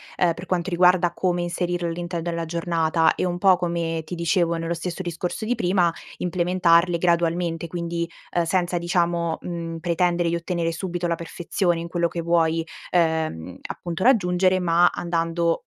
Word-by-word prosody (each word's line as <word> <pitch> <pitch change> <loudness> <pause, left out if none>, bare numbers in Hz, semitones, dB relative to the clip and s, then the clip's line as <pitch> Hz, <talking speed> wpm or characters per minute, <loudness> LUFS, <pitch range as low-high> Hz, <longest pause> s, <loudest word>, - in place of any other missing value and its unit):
ehm, 175 -2 +2
per 175 +3 -9
quanto 180 0 -1
riguarda 180 0 +4
come 180 -1 0
inserire 175 0 -2
all'interno 175 0 -3
della 170 0 -2
giornata 165 -1 +1
e - - -1
un 175 -1 -2
po', 190 -1 +5
come 170 -2 -2
ti 180 - -5
dicevo 170 0 +1
nello 165 +1 -2
stesso 170 +2 -4
discorso 175 +3 -4
di 240 +3 0
prima, 180 -5 +2 0.3
implementarle 175 -1 +2
gradualmente, 170 -1 0
quindi, 170 0 -3 0.3
uhm, 175 - +3
senza 175 +1 0
diciamo, 170 -1 0
mhmm, 165 -1 -5
pretendere 175 0 +1
di 170 - 0
ottenere 170 -1 -1
subito 175 +1 -3
la 170 - 0
perfezione 170 +1 -1
in 170 - -6
quello 170 0 +1
che 170 0 -4
vuoi, 165 -1 +1 0.3
ehm, 160 - 0
appunto 175 +1 -5
raggiungere, 185 -6 +3
ma 175 0 +4
andando 170 -1 -1
170 Hz, 160 wpm, -23 LUFS, 165-180 Hz, 0.3 s, po